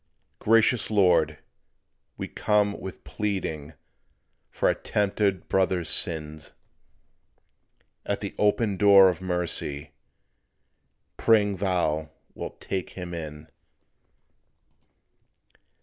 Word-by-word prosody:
Gracious 115 +2 +3
Lord, 85 -7 +3 0.8
we - - -5
come 105 -1 0
with 95 - -9
pleading 85 -8 -4 0.8
For - - -1
our - - +3
tempted 100 -3 -1
brother's 95 -3 0
sin; 80 -2 +2 1.6
At 100 - -2
the 100 - -6
open 105 -1 +1
door 100 -1 +7
of 90 0 -4
mercy 85 -5 -3 1.3
Praying 105 -3 +3
Thou 85 -5 -1 0.2
wilt - - -8
take 95 -2 -4
him 90 -1 -6
in. 80 -2 -7
95 Hz, 85 wpm, -25 LUFS, 80-105 Hz, 1.6 s, door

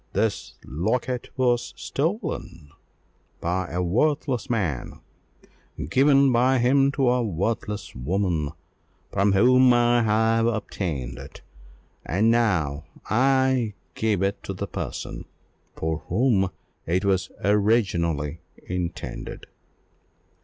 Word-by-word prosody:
This 110 -2 -1
locket 120 - -2
was 120 -2 +1
stolen 140 - -3 0.7
by 90 +1 -1
a 90 +2 -1
worthless 125 - 0
man, 90 - -2 0.9
given 140 0 +5
by 125 +2 +3
him 135 +3 +3
to 135 -3 +1
a 125 0 +2
worthless 105 +1 -2
woman, 80 +3 -1 0.6
from 100 +1 +2
whom 125 +5 +6
I 120 0 +4
have 115 +1 +2
obtained 85 - -3
it; - - -11 0.6
and 105 +6 +2
now 85 -11 +1 0.3
I 130 -2 +2 0.2
give 105 -4 0
it 100 +1 -1
to - - -5
the - - -3
person - - -6 0.5
for 80 0 -2
whom 100 -2 +2 0.4
it 90 +4 0
was 95 -1 +1
originally 90 -8 +1 0.3
destined." 90 -1 -5
110 Hz, 105 wpm, -24 LUFS, 90-125 Hz, 0.9 s, whom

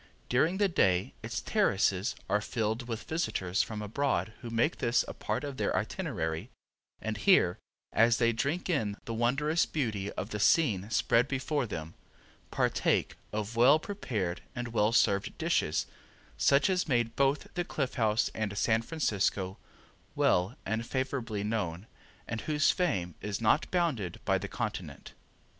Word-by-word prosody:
During 155 +9 +2
the 205 0 +3
day 95 - +2
its - - -4
terraces 95 0 +1
are 105 - +1
filled 110 +2 -2
with 115 -2 -4
visitors 100 - -1
from 105 -1 -4
abroad 115 0 -1
who 120 - -6
make 115 +8 +1
this 120 0 +2
a - - -5
part - - -3
of 140 -2 -5
their - - 0
itinerary, 100 - -3 0.5
and 110 -1 -3
here, 105 - +4 0.3
as 115 +1 +4
they 115 -1 +3
drink 140 +9 -1
in 110 - 0
the 115 - -4
wondrous 140 +8 +1
beauty 105 -9 -2
of 105 - -5
the 105 - -3
scene 105 - +3
spread 115 +2 +3
before 135 0 -1
them, 80 -5 -6 0.6
partake - - +1 0.2
of 105 +2 -3
well 125 +6 +6
prepared 115 - -3
and 120 0 -4
well 110 -1 +2
served 100 -4 +2
dishes - - +1 0.5
such 140 +5 +4
as 185 -3 +1
made 120 -4 +1
both 140 +1 +1
the 175 - -1
Cliff 140 -6 -2
House 110 -2 +1
and 105 -2 -3
San 110 +1 +2
Francisco 100 - -1 0.6
well 90 +7 +2
and 110 +3 -1
favorably 120 -5 -2
known 105 -4 -2 0.4
and 115 -2 -3
whose 150 +2 +3
fame 95 - -1
is 105 -1 -3
not 115 +7 +2
bounded 150 - -1
by - - +2
the - - -5
continent. - - -5
115 Hz, 150 wpm, -30 LUFS, 105-140 Hz, 0.6 s, well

